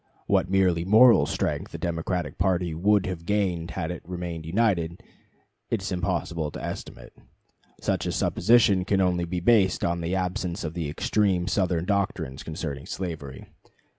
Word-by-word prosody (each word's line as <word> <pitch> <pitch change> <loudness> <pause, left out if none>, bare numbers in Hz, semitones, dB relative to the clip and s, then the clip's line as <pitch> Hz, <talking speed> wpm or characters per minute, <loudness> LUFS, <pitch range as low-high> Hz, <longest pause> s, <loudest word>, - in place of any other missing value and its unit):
What 90 - +2
merely 90 -3 +2
moral 110 +6 +6
strength - - -2
the - - -4
Democratic 85 -2 -3
party 90 -2 +1
would 100 +4 +2
have 90 -3 -4
gained 90 -4 -1
had 90 -2 -2
it 90 - -6
remained 85 -2 -6
united, 90 -3 0 0.7
it 110 -5 -1
is 95 - -4
impossible 85 -3 -2
to - - -8
estimate. - - -7 0.7
Such - - -1
a - - 0
supposition 105 -6 +3
can 95 +1 +1
only 90 -2 +1
be 90 +1 -3
based 95 -2 +3
on 85 0 -1
the 85 +3 -1
absence 90 0 -2
of 80 -1 -4
the 85 -4 -3
extreme 90 +3 +1
Southern 90 -4 0
doctrines 100 -10 -1
concerning 75 -3 -5
slavery. 75 -8 -6
90 Hz, 155 wpm, -26 LUFS, 85-95 Hz, 0.7 s, moral